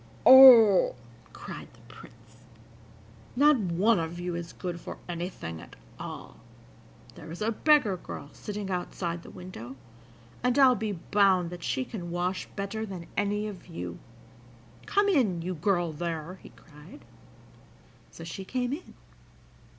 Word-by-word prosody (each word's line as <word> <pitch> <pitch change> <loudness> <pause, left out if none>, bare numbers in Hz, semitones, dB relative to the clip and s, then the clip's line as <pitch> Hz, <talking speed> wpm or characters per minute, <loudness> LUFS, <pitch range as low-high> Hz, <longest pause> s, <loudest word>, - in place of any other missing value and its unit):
"Oh," 245 -7 +9 0.4
cried - - -9
the - - -21
Prince, 115 0 -17 1.0
"not 290 +2 +5
one 195 +3 +2
of 165 +1 -5
you 175 0 -4
is 170 -1 -6
good 175 -2 -6
for - - -8
anything 170 - -6
at 85 - -14 0.2
all! 60 - -8 0.8
There - - -12
is 170 - -8
a 215 +2 0
beggar 230 -6 +3
girl 145 -4 -9
sitting 205 -2 -6
outside 175 -1 -4
the - - -13
window, 155 -9 -10 0.7
and 250 +1 +1
I'll 265 -2 +7
be 215 -2 -3
bound 185 -1 +2
that 175 -1 -8
she 255 - -2
can 185 -8 -7
wash 180 +2 -2
better 200 +2 -4
than 190 -5 -7
any 205 +1 -1
of 200 -4 -8
you! 170 - -7 0.9
Come 405 0 +2
in, 220 - +1
you 185 +2 -3
girl 175 -1 0
there!" 170 +2 -5
he - - -13
cried. 150 -2 -16 1.0
So 165 - -11
she 170 +4 -7
came 250 +5 -2
in. 315 - -9
185 Hz, 145 wpm, -28 LUFS, 170-215 Hz, 1.0 s, Oh